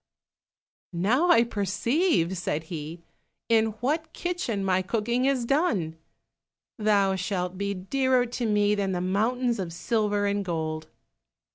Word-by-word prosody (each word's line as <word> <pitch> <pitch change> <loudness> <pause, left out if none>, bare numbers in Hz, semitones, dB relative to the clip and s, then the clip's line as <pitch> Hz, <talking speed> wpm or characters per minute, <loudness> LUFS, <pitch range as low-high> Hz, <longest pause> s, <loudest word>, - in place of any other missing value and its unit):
"Now 235 - +2
I 230 -9 +6
perceive," 210 - 0
said 160 -3 -2
he, 160 +2 -6 0.5
"in 220 -1 +3
what 310 +6 -1
kitchen 295 - -2
my 185 -1 +2
cooking 235 +6 0
is 265 -3 +1
done. 230 - +1 0.8
Thou 200 -2 +3
shalt 185 -2 -2
be 200 +1 -2
dearer 255 +6 +1
to 240 0 -3
me 210 -1 +3
than 200 -2 -1
the 180 - -1
mountains 230 +5 0
of 180 -3 -3
silver 205 +2 0
and 200 0 0
gold." 160 -3 -3
205 Hz, 130 wpm, -26 LUFS, 185-245 Hz, 0.8 s, I